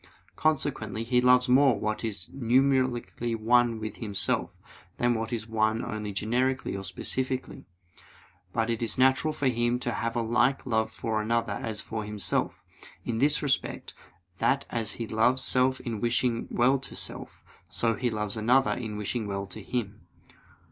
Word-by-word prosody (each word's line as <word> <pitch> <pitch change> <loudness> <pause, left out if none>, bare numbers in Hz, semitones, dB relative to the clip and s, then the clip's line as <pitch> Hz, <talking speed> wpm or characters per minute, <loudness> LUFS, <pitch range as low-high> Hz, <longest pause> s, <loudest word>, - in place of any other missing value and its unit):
Consequently 135 -8 0
he 125 +1 +2
loves 125 +1 +5
more 130 0 +5
what 110 +1 -2
is 100 -4 -4
numerically 130 -2 +1
one 115 +1 +3
with 110 -1 -5
himself, 100 -4 -1 0.4
than 120 0 +2
what 115 -1 -3
is 115 -2 -3
one 110 0 +1
only 105 -1 -4
generically 125 +6 0
or 95 - -5
specifically. 130 +7 -4 0.8
But 115 0 0
it 115 - -2
is 115 -3 0
natural 130 +4 +3
for 145 -2 -1
him 120 0 +1
to 120 - 0
have 115 0 -2
a 120 - +1
like 120 +4 +2
love 110 -3 0
for 110 -1 -2
another 115 -1 0
as 105 0 -2
for 110 -1 -4
himself, 105 -1 -2 0.4
in 115 -2 -2
this 145 +3 +2
respect, 135 -2 -1 0.5
that 140 +1 +2
as 115 -2 -2
he 115 - -4
loves 120 +4 +2
self 130 0 +2
in 115 -4 -5
wishing 120 0 0
well 130 +3 +3
to 135 - -9
self, - - -2 0.3
so 115 -1 +1
he 120 +3 -1
loves 105 -2 -3
another 125 +5 +3
in 110 -4 -4
wishing 105 +1 -3
well 100 0 -3
to 95 - -8
him. 105 -7 -4
115 Hz, 160 wpm, -28 LUFS, 110-125 Hz, 0.8 s, loves